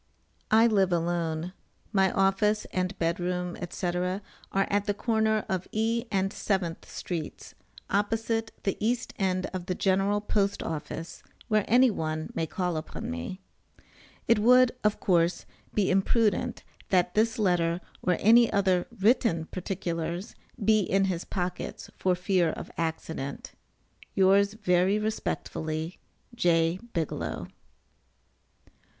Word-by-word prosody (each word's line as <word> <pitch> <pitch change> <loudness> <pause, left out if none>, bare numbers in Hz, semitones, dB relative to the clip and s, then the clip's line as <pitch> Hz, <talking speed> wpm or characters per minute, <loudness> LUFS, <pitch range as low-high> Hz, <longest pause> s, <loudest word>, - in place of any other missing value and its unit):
I 220 +1 +6
live 195 -5 +3
alone. 170 0 -1 0.4
My 190 -2 +4
office 210 +2 +2
and 185 +1 -1
bed 170 +1 0
room, 180 0 -2
&c., 185 - -5
are 180 +1 0 0.4
at 200 +1 +1
the 205 -2 0
corner 220 -1 +1
of 185 -1 -2
E. 230 +2 0
and 195 -1 +1
7th 185 -5 -2
streets, 165 -4 -6 0.3
opposite 225 +2 0
the 195 - -1
east 240 +2 0
end 185 -1 +1
of 185 -1 -5
the 185 - -1
General 195 +2 +2
Post 200 -1 0
Office, 165 +1 -5 0.3
where 215 -2 +2
any 250 +1 +5
one 155 -4 -3
may 165 - -1
call 180 0 -2
upon 155 - -5
me. 85 - -5 0.9
It 230 -2 +4
would, 250 +3 +6
of 210 -1 +2
course, 170 -1 +2 0.3
be 200 -3 +1
imprudent, 205 +3 +1 0.3
that 180 -1 +2
this 220 +1 +2
letter, 175 -5 +2 0.2
or 180 -2 +1
any 230 +2 +6
other 190 -3 +2
written 195 -6 +3
particulars, 175 0 -3 0.3
be 215 0 +5
in 195 0 +2
his 180 -3 -2
pockets 180 -2 -4
for 185 -1 +1
fear 180 -1 +2
of - - -6
accident. 160 -4 -4 0.6
Yours 200 +2 +4
very 185 -1 +2
respectfully, 165 -6 -3 0.3
J. 170 -5 +2
BIGELOW. 165 -4 -3
190 Hz, 125 wpm, -28 LUFS, 175-210 Hz, 0.9 s, I